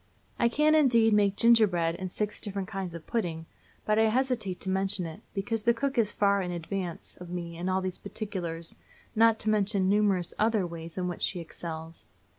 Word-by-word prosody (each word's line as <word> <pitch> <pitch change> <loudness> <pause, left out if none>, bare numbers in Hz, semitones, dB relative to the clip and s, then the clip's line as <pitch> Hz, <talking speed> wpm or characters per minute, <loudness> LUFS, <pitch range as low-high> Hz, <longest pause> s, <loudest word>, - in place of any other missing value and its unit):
I 235 - +4
can, 300 +5 +3
indeed, 235 -8 +5
make 205 -1 +3
gingerbread 195 -9 +4
and 185 -1 -5
six 210 +1 -2
different 195 -2 -4
kinds 190 -4 -5
of 165 - -9
pudding, 170 -8 -2 0.4
but 215 0 +2
I 220 0 +4
hesitate 235 -6 -1
to 190 - -4
mention 190 -1 +2
it, 160 -1 -8
because 210 +3 -2
the 235 +2 +3
cook 275 +3 -1
is 225 -4 +2
far 200 -1 +2
in 180 - -3
advance 175 0 -5
of 180 - -8
me 170 -1 -5
in 175 +3 -3
all 190 0 +1
these 185 -1 -4
particulars, 175 -6 -4 0.4
not 225 0 +5
to 215 - -1
mention 200 -2 +2
numerous 200 -4 +2
other 215 -3 +2
ways 165 0 -7
in 180 -1 -1
which 175 - -5
she 180 - 0
excels. 165 -1 -7
195 Hz, 195 wpm, -28 LUFS, 175-220 Hz, 0.4 s, indeed